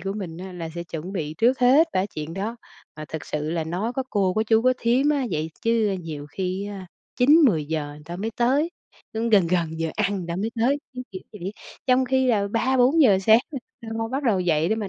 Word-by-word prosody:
của 195 +3 -3
mình 180 -6 -6
á 185 +1 -7
là 170 -2 -6
sẽ 170 0 -5
chuẩn 170 +3 -6
bị 155 -5 -3
trước 250 +3 +3
hết 265 +6 +6
ba - - +1
cái 195 - -1
chuyện 155 +2 -5
đó. 215 +5 -3 0.4
Mà 155 - -6
thực 160 - -7
sự 150 +1 -3
là 165 -1 -1
nói 185 +9 -2
có 265 - -1
cô, 190 -3 +1
có 215 - +2
chú, 220 0 +3
có 255 0 +4
thím 250 +5 +2
á 280 -4 +1
vậy 155 -1 -2
chứ 225 -4 +2
nhiều 150 -3 -6
khi, 190 +4 -3
ơ, 205 -1 -6 0.4
9:00-10:00 180 - +3
người 150 - -13
ta 170 +2 -6
mới 215 +5 -3
tới, 275 +8 +2 0.4
cũng 225 +1 -1
gần 200 -5 +5
gần 165 -2 -1
giờ 165 -1 -1
ăn 205 -1 +1
người 180 - -5
ta 170 - -2
mới 210 +4 -2
tới, 275 +5 +3 0.2
cứ 250 - -5
kiểu 185 - -6
vậy. 195 -1 -6 0.3
Trong 255 0 +4
khi 260 0 +2
là 205 -4 +2
3:00-4:00 250 0 +4
sáng 220 +4 +6
là 275 - -3 0.2
lo 225 - -9
lo 225 - -2
bắt 270 +4 -2
đầu 210 -7 +2
dậy 165 -2 +1
để 220 - +2
mà 205 -3 -3
200 Hz, 240 wpm, -24 LUFS, 170-245 Hz, 0.4 s, hết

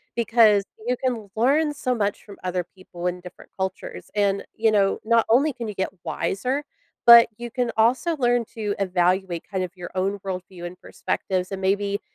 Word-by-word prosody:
because 225 -3 +4 0.2
you 250 +1 0
can 235 -6 -3
learn 290 +7 +2
so 255 -3 -1
much 205 -3 -1
from 200 -2 -12
other 180 -1 -2
people 180 -2 -6
in 180 0 -3
different 180 0 -13
cultures, 190 0 -5
and, 200 -1 +1
you 225 0 +2
know, 200 -2 +2
not 230 0 +3
only 275 +6 +4
can 235 -2 -6
you - - -5
get 190 -1 -2
wiser, 255 +8 -2 0.4
but 235 -1 +10
you 240 0 -6
can 245 -1 -1
also 255 +9 +2
learn 245 -2 +2
to 210 -2 -4
evaluate 180 -2 +1
kind 190 -2 -2
of 180 - -5
your 175 - -7
own 195 +2 -1
world 185 -1 -3
view 175 -2 -9
and 175 +1 -8
perspectives 185 -1 -3
and 195 - -5
maybe, 200 +1 0
205 Hz, 190 wpm, -24 LUFS, 190-235 Hz, 0.4 s, but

